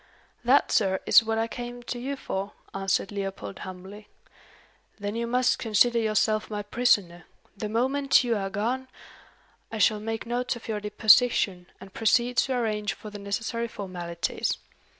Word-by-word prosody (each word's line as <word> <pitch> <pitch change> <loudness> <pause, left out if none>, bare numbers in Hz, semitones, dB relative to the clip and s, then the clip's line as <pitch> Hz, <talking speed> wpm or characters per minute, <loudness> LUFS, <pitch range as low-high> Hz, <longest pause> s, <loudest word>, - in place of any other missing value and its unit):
"That, 255 +4 +4
sir, 190 -3 +2
is - - +7
what 225 0 -1
I 225 0 +1
came 245 0 -7
to 240 0 -5
you 275 +3 -3
for," 200 -6 -4 0.2
answered 195 0 0
Leopold, 195 - -5
humbly. 190 +3 -9 0.9
"Then 205 +1 -4
you 235 0 -2
must 250 +1 +2
consider 235 +2 +3
yourself 215 -1 +1
my 210 -1 -4
prisoner. 205 -6 +1 0.3
The 210 +1 -4
moment 265 +6 +3
you, 235 -2 +1
are 195 -2 -2
gone, 240 +7 -2 0.8
I 225 - -4
shall 215 0 +3
make 225 +1 -4
notes 245 +2 -1
of 235 - -11
your 215 -2 -2
deposition, 210 -3 +3
and 190 0 -13
proceed 240 +2 +2
to 265 - +2
arrange 215 -3 -1
for 215 - -10
the 205 - -8
necessary 225 +4 -2
formalities. 175 -5 -3
215 Hz, 155 wpm, -27 LUFS, 200-240 Hz, 0.9 s, is